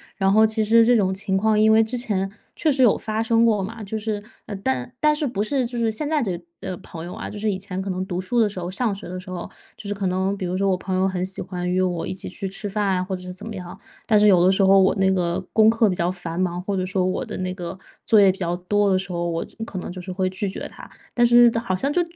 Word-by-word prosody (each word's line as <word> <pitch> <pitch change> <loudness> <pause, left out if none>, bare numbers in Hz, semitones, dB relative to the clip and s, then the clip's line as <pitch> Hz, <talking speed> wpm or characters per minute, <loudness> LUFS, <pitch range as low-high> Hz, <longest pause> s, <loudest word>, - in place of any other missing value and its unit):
然 195 -1 +2
后 220 +2 +6
其 220 0 0
实 230 +1 +5
这 245 0 +5
种 190 -4 +2
情 190 0 -2
况 215 +2 +2
因 220 0 +5
为 220 +1 +6
之 240 +3 -3
前， 195 -5 -2 0.2
确 310 - +1
实 260 -1 +2
有 230 - +5
发 220 +1 -2
生 230 0 +3
过 215 -4 +3
嘛， 225 +2 -7
就 210 +2 -4
是， 215 -1 -3 0.2
呃， 205 - -6
但 130 -9 -2
但 300 0 +3
是 300 - -2
不 235 -7 -2
是 250 +4 0
就 240 - -6
是 230 -1 +2
现 290 +7 -3
在 305 -2 +1
这 185 -6 -2 0.4
朋 165 -1 -8
友 180 - -7
啊， - - -6
就 210 - -8
是 215 0 0
以 190 - -2
前 190 -1 -5
可 195 - -5
能 185 0 -2
读 180 -1 -3
书 235 +6 -1
的 220 - +4
时 200 -2 -8
候， 175 0 -4
上 215 +1 0
学 195 - -8
的 185 0 -5
时 185 - -11
候， 180 -1 -6 0.3
就 205 - -10
是 - - 0
可 200 -1 -4
能 190 +2 0
比 185 - -4
如 180 - -2
说 195 +1 +1
我 185 - +2
朋 190 0 -3
友 185 - +2
很 185 -1 -2
喜 190 - -4
欢 180 -1 -4
约 185 +1 +1
我 180 -2 -1
一 - - -3
起 190 - -5
去 195 +2 -5
吃 195 +2 -4
饭 210 +1 -1
啊 185 -1 +1
或 190 0 -3
者 180 - -11
是 180 0 -7
怎 185 - -8
么 225 - -6
样， 180 -2 -8 0.3
但 215 - +4
是 210 0 +5
有 180 -2 +5
的 - - +6
时 195 - +1
候 195 0 +6
我 190 0 +4
那 190 -1 +2
个 175 -1 0
功 220 0 +5
课 225 -2 +3
比 180 - -1
较 170 +1 0
繁 180 -1 -5
忙， 180 -1 -1
或 195 -1 -2
者 185 - -1
说 185 0 0
我 185 - -1
的 - - -7
那 185 0 -2
个， 180 0 -6 0.3
作 215 -3 +5
业 195 -1 +6
比 190 - -10
较 175 -2 -1
多 200 +3 +1
的 190 - +3
时 190 0 -4
候， 175 0 -2
我 165 0 -2 0.2
可 190 - -6
能 - - -6
就 185 - -8
是 185 - -10
会 185 0 -1
拒 190 +2 -3
绝 190 - -5
他。 - - -13 0.2
但 240 -1 +4
是 240 0 +7
好 210 -5 -2
像 275 +9 -1
就， 350 +4 +2
195 Hz, 330 characters per minute, -23 LUFS, 185-220 Hz, 0.4 s, 是